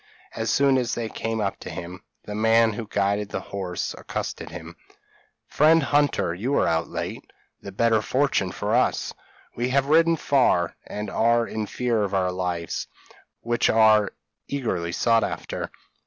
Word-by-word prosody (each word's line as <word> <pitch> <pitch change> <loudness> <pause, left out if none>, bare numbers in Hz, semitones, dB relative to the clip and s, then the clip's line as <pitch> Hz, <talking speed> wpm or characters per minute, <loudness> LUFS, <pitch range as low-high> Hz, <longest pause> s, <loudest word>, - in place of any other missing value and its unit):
As - - -2
soon 140 -2 +4
as 120 -2 -1
they 115 -2 -3
came 115 0 -3
up 100 -2 -2
to - - -8
him, 90 0 -7 0.2
the 105 - -7
man 110 +1 +3
who 110 +1 -6
guided 100 0 0
the - - -3
horse 95 -3 -4
accosted - - -5
him. - - -9 0.7
'Friend 160 +1 +4
Hunter, 145 -11 +1
you 120 +11 -1
are - - +3
out 80 0 +1
late, - - -6 0.3
the 100 - -8
better 110 +2 +2
fortune 130 -7 +1
for 105 +1 -2
us; 125 - +1 0.4
we 120 +1 -1
have 135 +1 +2
ridden 165 +2 +5
far, 125 - +2
and 105 -1 -5
are 115 +1 +3
in 110 -2 -4
fear 120 -1 0
of 100 -1 -1
our 90 -1 +1
lives 90 -2 -3 0.5
which 120 0 +1
are 110 -2 +5 0.4
eagerly 95 -11 -2
sought 115 +4 +2
after. - - -4
110 Hz, 160 wpm, -24 LUFS, 100-125 Hz, 0.7 s, ridden